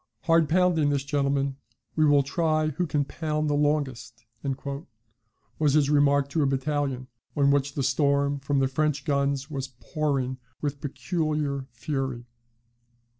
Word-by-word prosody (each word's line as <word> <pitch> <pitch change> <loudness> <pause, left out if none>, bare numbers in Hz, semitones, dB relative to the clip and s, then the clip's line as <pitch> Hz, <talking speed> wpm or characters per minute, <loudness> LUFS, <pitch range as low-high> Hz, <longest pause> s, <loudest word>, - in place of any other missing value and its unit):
"Hard 165 -2 +3
pounding 170 -3 +3
this, 140 -2 0
gentlemen: 140 -1 0 0.4
we 155 - +4
will 145 -1 +5
try 155 +1 +1
who 170 +4 -2
can 145 -2 0
pound 155 0 -2
the - - +2
longest," 140 -6 -1 1.3
was 150 -3 +3
his 145 -1 +3
remark 145 -1 +4
to 155 +2 0
a 140 - +3
battalion, 135 -1 -1 0.3
on 140 -1 +4
which 140 0 +1
the 140 - -1
storm 140 +1 +2
from 140 +1 -1
the 135 -1 +3
French 140 +1 0
guns 140 0 0
was 135 -2 -3
pouring 135 -5 -1 0.2
with 145 -1 -3
peculiar 150 -3 -2
fury. 130 0 -3
145 Hz, 140 wpm, -26 LUFS, 135-150 Hz, 1.3 s, will